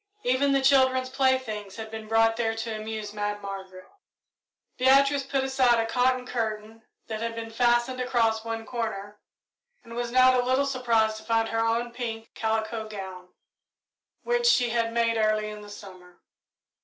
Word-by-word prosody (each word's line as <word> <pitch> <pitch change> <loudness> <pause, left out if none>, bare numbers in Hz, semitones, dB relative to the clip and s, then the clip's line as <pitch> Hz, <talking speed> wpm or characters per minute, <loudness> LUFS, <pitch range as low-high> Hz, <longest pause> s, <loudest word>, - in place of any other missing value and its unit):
Even 260 +3 +2
the 275 -1 +2
children's 260 -1 +3
playthings 260 -7 0
had 220 -1 -7
been 220 -1 -7
brought 225 0 +3
there 225 -1 -1
to 225 0 -4
amuse 215 -1 -5
Mad 205 0 -3
Margaret. 190 -2 -8 0.9
Beatrice 275 +2 +4
pulled 270 0 -1
aside 260 -3 +3
a 225 - +1
cotton 250 +2 +1
curtain 220 -2 -4 0.2
that 220 -1 -5
had 230 0 -3
been 225 0 -6
fastened 240 +2 +1
across 230 -3 +1
one 225 0 -5
corner, 210 -3 -5 0.6
and 230 - -12
was 240 0 -2
not 255 +1 +6
a - - -4
little 260 +3 +2
surprised 230 -5 +1
to 220 - -11
find 225 0 +1
her 225 0 0
own 230 +1 0
pink 230 -2 -6
calico 220 0 -2
gown, 190 -3 -8 1.0
which 480 0 +1
she 245 - +4
had 230 -1 0
made 230 0 +1
early 215 0 +1
in 210 0 -9
the 205 - -11
summer. 185 -3 -13
225 Hz, 165 wpm, -26 LUFS, 215-255 Hz, 1.0 s, not